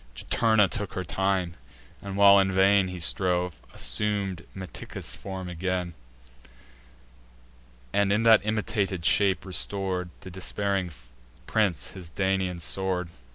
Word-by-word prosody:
Juturna 110 - +2
took 100 +1 -4
her 95 - -2
time; 95 +1 -1 0.5
and, 100 -1 -6
while 100 0 +8
in 95 0 +2
vain 95 +1 +4
He 90 -1 -6
strove, 90 0 +1
assum'd 95 - -1
Meticus' 95 -1 -5
form 95 -1 -6
again, 90 0 -2 2.0
And, 100 -1 +2
in 105 +3 +2
that 115 -1 +7
imitated 105 -4 -1
shape, 95 -3 +3
restor'd 95 -1 -2
To - - -16
the 95 - -9
despairing 95 0 -2 0.5
prince 105 -8 0
his 90 -3 -10
Daunian 95 -1 -1
sword. 90 0 -1
95 Hz, 120 wpm, -27 LUFS, 90-100 Hz, 2.0 s, while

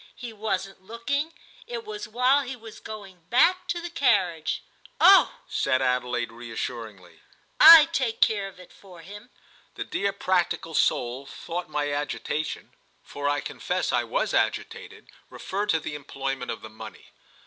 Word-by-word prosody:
He 240 -2 -8
wasn't 195 -3 -3
looking; 235 +10 -3 0.4
it 480 -2 -6
was 425 -1 -6
while 250 +5 +3
he 265 -1 -6
was 225 -2 -12
going 200 -5 -10
back 360 +9 +3
to 345 - -2
the 345 0 -7
carriage." 190 - +1 0.4
"Oh," - - +7
said 130 - +1
Adelaide 125 -2 -1
reassuringly, 115 -5 -7 0.4
"I 325 -2 +11
take 260 -8 -1
care 205 -3 +2
of 190 -1 -13
it 180 - -15
for 180 -4 -15
him!" 205 +7 -12 0.5
The - - -4
dear 200 0 -1
practical 180 -4 -1
soul 125 -1 0
thought 175 0 -6
my 145 -1 -1
agitation, 150 +1 -3 0.3
for 145 0 -3
I 145 0 0
confess - - -3
I - - +2
was - - -1
agitated, - - -2 0.2
referred 205 +2 -4
to 160 - +3
the 150 - -6
employment 135 -2 -5
of 115 - -5
the 110 - -8
money. 110 - -12
190 Hz, 150 wpm, -26 LUFS, 145-235 Hz, 0.5 s, I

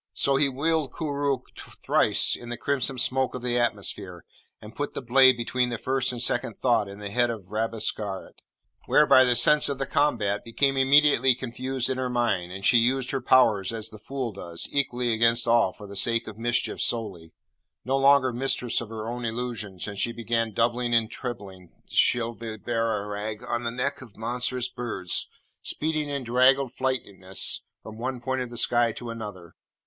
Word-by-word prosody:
So 140 - +2
he 140 +1 +3
whirled 155 +2 0
Koorookh 140 -4 -1 0.4
thrice - - +2
in 120 - -9
the 120 - -4
crimson 135 -1 -1
smoke 130 +1 0
of 125 - -6
the 120 -1 0
atmosphere, 100 -6 -3 0.3
and 105 +1 -12
put 145 - -3
the - - -3
blade 130 +1 +6
between 125 +1 0
the 120 - -3
first 130 +2 -1
and 125 - -6
second 120 -2 -1
thought 115 -5 +2
in 100 0 -9
the 100 -1 -6
head 120 +2 +2
of 105 -5 -7
Rabesqurat, 110 -3 -3 0.5
whereby 150 -3 +6
the 125 -1 +2
sense 150 +4 +4
of 140 - -2
the 135 - -2
combat 120 -9 0
became 135 +4 +1
immediately 135 -1 +5
confused 130 +1 -3
in 130 -1 -2
her 130 -1 -1
mind, 110 -8 0
and 95 +1 -6
she 120 - +6
used 125 +2 +1
her 135 -2 -2
powers 115 -6 +4
as 110 -2 -3
the 110 - -11
fool 130 -2 -4
does, 85 -4 -5
equally 125 -4 0
against 115 +1 +2
all, 115 0 +4
for 105 - -12
the 100 0 -10
sake 115 +3 0
of 110 - -7
mischief 120 +2 -1
solely 95 -8 -3 0.5
no 130 +2 +1
longer 135 -2 +4
mistress 125 -1 -1
of 115 - -7
her 110 -1 -6
own 120 +1 -4
Illusions; 115 -5 -4
and 100 -1 -6
she 120 - +1
began 115 -1 -1
doubling 120 +2 +1
and 115 -1 +2
trebling 100 -8 -7 0.2
Shibli 115 -2 +1
Bagarag 110 0 -3
on 120 0 -2
the - - 0
neck 135 +4 -3
of 115 -6 -14
monstrous 125 +2 -2
birds, 105 -7 -2 0.3
speeding 155 -1 -2
in 140 -2 -3
draggled 130 +2 +3
flightiness 100 -9 -2 0.2
from 110 0 -10
one 130 +1 -3
point 130 +1 -2
of 125 - -4
the 120 - -9
sky 120 0 +2
to 120 0 -7
another. 105 -7 -8
120 Hz, 180 wpm, -26 LUFS, 110-130 Hz, 0.5 s, blade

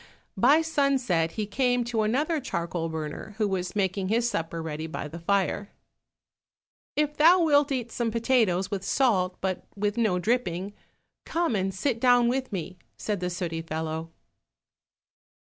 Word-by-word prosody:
By 275 +10 +5
sunset 265 - +1
he 215 - -2
came 245 +3 +1
to 235 -2 -1
another 290 +9 +1
charcoal 170 - -3
burner, 160 +6 -6
who 215 -2 +1
was 185 -1 -3
making 190 -1 0
his 230 +4 +2
supper 165 -7 -3
ready 160 -1 -4
by 155 - -5
the 165 +3 -8
fire. 200 +3 0 1.3
"If 300 0 0
thou 340 +4 +6
wilt 290 -2 +4
eat 245 -4 -2
some 235 -2 -1
potatoes 220 -5 +1
with 195 -2 -3
salt, 195 -7 +1
but 190 -1 -2
with 205 +2 -1
no 215 -6 +2
dripping, 190 -2 -1 0.5
come 335 -8 0
and 195 -1 0
sit 230 +5 -1
down 245 -1 +5
with 260 0 -2
me," 185 -1 -5 0.2
said 210 -3 -2
the 180 0 -2
sooty 170 -2 -3
fellow. 160 0 -4
205 Hz, 150 wpm, -27 LUFS, 180-245 Hz, 1.3 s, thou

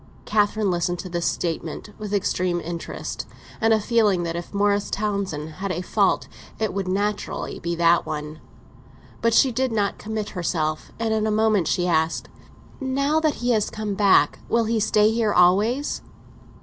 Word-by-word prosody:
Catherine 210 -1 +1
listened 175 0 0
to 185 - -8
this 175 -1 -1
statement 165 +3 -3
with 210 -1 -5
extreme 185 -3 0
interest, 170 0 -5 0.3
and 225 0 +3
a 220 - +5
feeling 210 -5 +2
that 170 0 -3
if 170 0 -6
Morris 205 0 +1
Townsend 200 -7 -2
had 195 0 -2
a 180 +1 -3
fault - - +1 0.3
it 220 -2 -1
would 195 -1 -2
naturally 205 +2 -2
be 170 0 -2
that 170 0 +4
one. 150 0 -5 0.8
But 230 0 +2
she 265 - +5
did 255 +1 0
not 205 -3 0
commit 215 -1 -4
herself, 160 -4 -2
and 225 -1 0
in 215 0 +1
a - - +1
moment 215 -5 +2
she 175 - +1
asked: 160 -1 0 0.5
"Now 275 +3 +1
that 310 -2 +1
he 245 - +3
has 215 -3 +1
come 215 -1 -4
back, 195 -7 +4
will 230 -1 +2
he 225 0 +1
stay 210 0 +3
here 225 -2 +1
always?" 205 +10 +3
205 Hz, 170 wpm, -23 LUFS, 175-220 Hz, 0.8 s, a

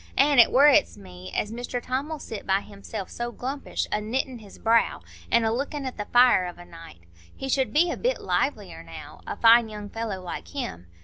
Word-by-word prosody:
An' 280 0 +5
it 235 - +7
worrets 270 - +5
me 90 -1 -11
as 210 - -1
Mr 245 +1 -4
Tom'll 275 +6 -3
sit 225 -8 -8
by 195 +1 +2
himself 200 -1 -8
so 240 0 -4
glumpish, 270 +4 -4
a 210 - 0
knittin' 245 +3 -2
his 205 -3 -14
brow, 230 0 +2 0.3
an' 235 - +4
a 225 0 +1
lookin' 280 +3 -3
at 260 - -5
the 210 - -4
fire 240 -6 +5
of 175 - -8
a 175 - -12
night. 165 - -13 0.4
He 270 - -5
should 265 -1 +1
be 335 +4 +3
a - - -4
bit - - 0
livelier - - -2
now, - - -11
a - - -4
fine 230 0 +6
young 210 -1 -8
fellow 225 -4 -4
like 175 - -7
him. 85 +1 -6
230 Hz, 205 wpm, -25 LUFS, 195-260 Hz, 0.4 s, it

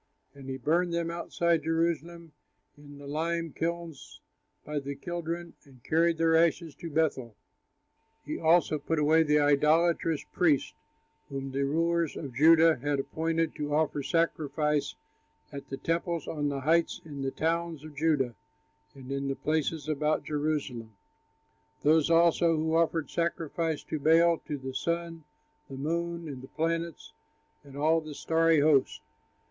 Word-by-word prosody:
And 135 -1 -11
he 130 - -3
burned 170 +6 +1
them 170 0 -1
outside 170 -1 0
Jerusalem 165 +1 -2 0.4
in 145 -1 -14
the 145 - -11
lime 165 +2 -2
kilns 170 -3 -5 0.5
by 150 0 -2
the 140 0 -6
Kidron, 170 +2 -5
and 130 -5 -20
carried 165 +1 +2
their 165 0 +3
ashes 165 -1 +2
to 170 - -7
Bethel. 145 -7 -1 0.9
He - - -4
also 160 -1 +3
put 165 - -2
away 155 +2 +4
the 150 -1 +3
idolatrous 155 +2 +2
priests, 155 -6 +2 0.6
whom 135 -1 -5
the 140 +1 0
rulers 165 +2 0
of 140 -5 -6
Judah 160 +4 +6
had 145 +2 -1
appointed 165 +3 -1
to 145 -1 -2
offer 150 -2 0
sacrifice 150 -1 0 0.6
at 140 -1 -9
the 135 - -4
temples 165 +1 -2
on 145 -2 -2
the 140 -1 -3
heights 165 +4 +2
in 145 -3 -7
the 135 - -1
towns 165 +1 -2
of 155 -2 -11
Judah 145 -5 +1 0.6
and 135 -1 -10
in 140 0 -2
the 135 - -1
places 155 0 -1
about 150 0 0
Jerusalem; 145 -7 -3 0.9
those 155 +1 +4
also 170 0 +4
who 160 +1 -1
offered 165 -3 +1
sacrifices 165 -1 -2
to 155 - -4
Baal, 165 +3 +4
to 150 - -3
the 130 -1 -7
sun, 170 +3 -3 0.4
the 135 - -7
moon, 170 +3 -3
and 135 -4 -7
the 130 - -10
planets 165 +2 -3 0.5
and 140 -1 -12
all 160 +3 +2
the 155 -2 -9
starry 165 -1 +2
host. 145 -3 +3
155 Hz, 150 wpm, -29 LUFS, 145-165 Hz, 0.9 s, Judah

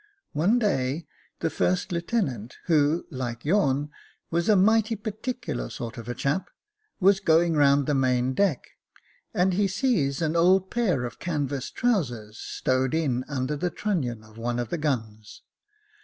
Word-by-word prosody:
One 180 +11 +3
day, 160 - 0 0.4
the 165 - 0
first 180 0 0
lieu 170 -1 0
tenant, 130 - -2
who, 155 -1 +2
like 120 -3 -5
yourn, 145 -5 +2 0.4
was 170 +4 +1
a 210 - +6
mighty 220 +3 +4
particular 215 - -4
sort 120 +1 -6
of 120 +1 -6
chap, 165 +8 -1 0.5
was 195 0 +5
going 165 -2 +3
round 140 -1 +4
the 150 - +1
main 130 -1 +2
deck, 175 -3 +1 0.7
and 180 +1 +2
he 200 +2 +2
sees 190 - +1
an 160 0 0
old 185 +3 +4
pair 185 - +1
of 120 - -7
canvas 140 -5 -2
trousers 120 - -1
stowed 130 +2 0
in 135 -6 0
under 140 0 -2
the 175 +5 -1
trunnion 135 - -2
of 110 +1 -15
one 120 +1 -2
of 120 -2 -2
the 170 - -2
guns. 110 -8 -3
150 Hz, 155 wpm, -26 LUFS, 130-190 Hz, 0.7 s, a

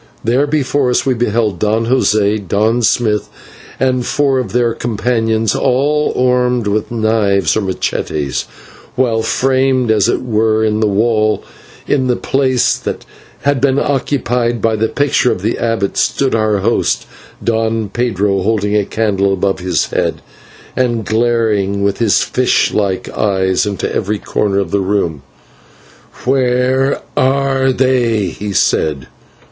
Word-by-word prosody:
There 125 +6 +1
before 145 -2 0
us 125 - +1
we 135 - +2
beheld 110 -5 -1
Don 110 +2 +1
José, 105 -4 +1
Don 110 +6 +1
Smith, 110 -1 +1 0.5
and 130 -1 +1
four 135 +1 +1
of 120 -7 -4
their 120 0 +1
companions, 115 -1 0
all 145 +4 +1
armed 125 -2 +1
with 105 +1 -1
knives 110 -5 +1
or 110 - +1
/machetes/, 75 -7 -2 0.5
while, 120 -3 +1
framed, 130 0 +1
as 110 0 +2
it - - -1
were 110 -2 +1
in 105 0 0
the 110 - +2
wall, 110 +1 +1 0.4
in 130 -3 +1
the 125 - +2
place 130 -2 +1
that - - -5 0.4
had 140 -2 +1
been 135 -1 +2
occupied 125 -4 0
by 110 +1 +1
the 110 +1 0
picture 145 -1 +1
of 95 - -4
the 110 - -1
abbot, 115 -4 -1
stood 135 -1 +1
our 110 -2 +1
host, 115 +4 0 0.4
Don 115 -2 0
Pedro, 100 -4 0
holding 105 0 0
a 105 -1 +2
candle 100 -3 0
above 95 0 0
his 90 -2 0
head, - - -1 0.5
and 120 -4 0
glaring 110 -3 0
with 100 0 0
his 115 -4 +3
fish 125 0 +1
like 100 -3 -1
eyes 95 -2 0
into 100 -2 -3
every 105 +2 -1
corner 100 0 -1
of 100 - -1
the 100 - +1
room. 95 -7 -1 1.0
"Where 130 +1 +1
are 135 0 +1
they?" 125 -4 +1
he 105 +4 -6
said. 75 -7 0
115 Hz, 140 wpm, -15 LUFS, 105-125 Hz, 1.0 s, his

